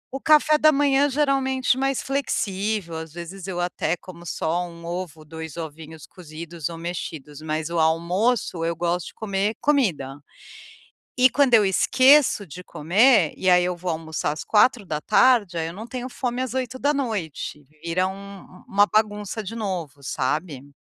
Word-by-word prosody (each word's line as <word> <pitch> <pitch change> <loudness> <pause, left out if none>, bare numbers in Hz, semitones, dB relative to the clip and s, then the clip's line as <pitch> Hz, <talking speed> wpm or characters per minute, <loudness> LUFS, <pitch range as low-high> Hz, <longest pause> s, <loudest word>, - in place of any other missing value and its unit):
O 270 - -5
café 305 0 +5
da 310 0 +6
manhã 285 0 +3
geralmente 265 -2 +1
mais 270 0 0
flexível, 205 -9 -2
às 160 -1 -8
vezes, 175 +2 -8
eu 180 -2 -4
até 175 -1 -1
como 175 -1 -12
só 170 +3 -1
um 170 0 -12
ovo, 170 -3 -6
2 160 +1 -8
ovinhos 160 0 -8
cozidos 165 -1 -8
ou 165 - -7
mexidos, 160 -4 -6
mas 155 +1 -3
o 170 - 0
almoço 170 +4 +1
eu 165 0 -1
gosto 175 +1 -1
de - - -11
comer 205 0 -1
comida. 170 - 0 1.0
E 255 +1 +7
quando 265 -1 +3
eu 210 -3 +6
esqueço 255 +3 +4
de 175 +3 -10
comer, 190 - +3
e 185 - +1
aí 180 0 +5
eu 180 0 -2
vou 180 +1 -4
almoçar 160 -2 -3
às 155 - -6
16h, 210 -1 +3
aí 160 - -1
eu 165 - -7
não 220 +4 -8
tenho 255 +1 -5
fome 245 0 -3
às 255 -2 -3
20h, 245 - -2 0.2
vira 170 +2 0
um 200 0 -9
u 185 - -17
uma 205 +1 +4
bagunça 210 0 -1
de 215 +3 -7
novo, 175 - -5
sabe. 140 +1 -3
185 Hz, 160 wpm, -23 LUFS, 165-240 Hz, 1.0 s, E